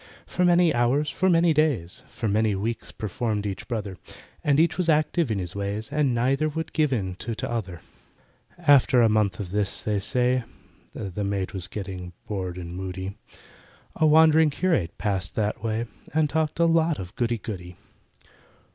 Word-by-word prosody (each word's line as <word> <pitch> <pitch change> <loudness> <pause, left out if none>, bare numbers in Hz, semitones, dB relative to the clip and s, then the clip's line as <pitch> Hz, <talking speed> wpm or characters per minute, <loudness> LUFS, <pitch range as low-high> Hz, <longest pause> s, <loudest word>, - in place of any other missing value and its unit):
For 180 - -1
many 175 -2 +4
hours—for 145 +9 +1
many 170 -1 +4
days— 135 - +1
For 115 - -4
many 105 0 +2
weeks 110 +4 -3
performed 110 0 -3
each 100 -2 -5
brother, 105 -6 -4 0.5
For 145 - +3
each 165 +1 +3
was 180 -2 -1
active 155 0 +2
in 110 - 0
his 90 -1 -2
ways, 100 +5 -3
And 145 -4 +1
neither 135 +6 +1
would 160 +2 -5
give 150 -2 +2
in 95 -7 -1
to 115 +2 -4
t'other. 100 -8 -4 0.8
After 140 -7 +5
a 115 - +5
month 105 -4 +1
of 95 -4 -5
this, 100 -1 -1
they 105 -2 0
say 125 +4 +1 0.5
(The 100 +1 -4
maid 100 -1 -2
was 95 -2 -6
getting 95 -3 -6
bored 95 -4 -4
and 85 -1 -7
moody) 95 +1 -5 0.8
A 155 - +3
wandering 160 0 +6
curate 145 - 0
passed 95 -5 -2
that 105 +1 -1
way 115 +1 -1 0.3
And 155 -1 +3
talked 155 +1 -1
a 170 - +5
lot 165 -1 +3
of 95 +2 -8
goody 120 -1 0
goody. 90 -5 -7
115 Hz, 165 wpm, -25 LUFS, 100-150 Hz, 0.8 s, wandering